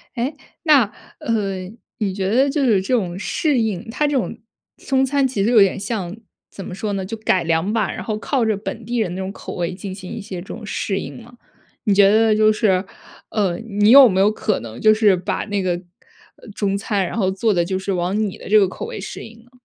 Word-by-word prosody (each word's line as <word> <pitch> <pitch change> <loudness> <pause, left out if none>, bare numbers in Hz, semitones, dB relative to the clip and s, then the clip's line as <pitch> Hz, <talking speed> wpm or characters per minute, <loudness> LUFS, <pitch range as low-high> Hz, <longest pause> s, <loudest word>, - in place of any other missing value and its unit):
诶， 260 +5 -2 0.3
那， 300 -6 +6 0.4
呃， 195 -5 -2 0.3
你 200 -4 -1
觉 190 0 -2
得 260 +6 +3
就 280 -1 0
是 215 -6 +3
这 195 +7 -2
种 180 -6 -2
适 280 - 0
应， 215 -5 -2
它 295 +6 0
这 290 -1 +1
种 225 -1 -2 0.4
中 265 0 +1
餐 275 0 +1
其 220 -6 -1
实 225 - +2
有 225 -4 +6
点 195 0 +3
像 200 -3 -4 0.3
怎 195 - -9
么 - - -7
说 205 +2 -3
呢？ 195 -1 -2
就 220 +4 -5
改 190 -4 +1
良 165 +4 0
吧， 220 -1 0
然 - - -6
后 215 -2 -3
靠 255 +3 0
着 220 -2 +1
本 220 +2 -6
地 240 +2 -2
人 205 -6 0
那 185 - -4
种 190 0 -4
口 - - -8
味 175 +1 -2
进 190 +1 -7
行 185 -1 -9
一 230 - -5
些 195 -4 -7
这 190 - -13
种 - - -8
适 195 -1 -2
应 - - -8
吗？ 240 +1 -15 0.5
你 210 - +2
觉 195 0 +6
得 220 +1 +4
就 215 0 +5
是， 200 -4 +2 0.5
呃， 190 -5 0
你 210 -1 +2
有 270 -1 +10
没 190 -1 0
有 200 +2 +5
可 215 -1 -1
能 115 0 -9
就 215 - +6
是 215 -3 +4
把 180 0 -3
那 205 -2 -2
个， 185 -1 0 0.7
呃， - - -16
中 200 -1 0
餐， 200 -2 -1
然 - - -5
后 190 -4 +1
做 205 +3 +1
得 175 -2 +2
就 190 +2 -2
是 195 +1 -2
往 180 +3 -1
你 190 - -7
的 - - -10
这 215 +1 +6
个 195 - +4
口 190 - -6
味 475 - -6
适 - - -7
应 225 0 -13
呢？ 245 - -26
205 Hz, 265 characters per minute, -20 LUFS, 190-230 Hz, 0.7 s, 有